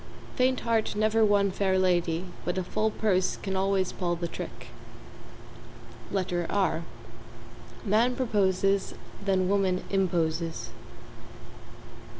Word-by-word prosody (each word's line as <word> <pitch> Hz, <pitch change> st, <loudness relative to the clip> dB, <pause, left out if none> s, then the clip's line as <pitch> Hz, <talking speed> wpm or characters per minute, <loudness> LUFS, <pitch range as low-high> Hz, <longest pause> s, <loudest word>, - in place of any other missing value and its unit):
Faint 255 Hz, 0 st, +2 dB
heart 225 Hz, -3 st, 0 dB
never 215 Hz, +1 st, +3 dB
won 200 Hz, -2 st, +3 dB
fair 190 Hz, 0 st, +1 dB
lady 175 Hz, -2 st, +1 dB, 0.2 s
but 180 Hz, +1 st, -2 dB
a 185 Hz, -, 0 dB
full 215 Hz, +4 st, 0 dB
purse 195 Hz, -4 st, +1 dB
can 195 Hz, -1 st, -4 dB
always 190 Hz, -1 st, +1 dB
pull 175 Hz, -2 st, -1 dB
the 170 Hz, 0 st, -3 dB
trick. -, -, -8 dB, 1.8 s
R 185 Hz, -4 st, +1 dB, 1.0 s
Man 225 Hz, +5 st, +3 dB
proposes, 195 Hz, -5 st, +1 dB, 0.3 s
then 190 Hz, -2 st, +1 dB
woman 190 Hz, -2 st, +1 dB
imposes. 170 Hz, -4 st, 0 dB
195 Hz, 105 wpm, -28 LUFS, 180-210 Hz, 1.8 s, never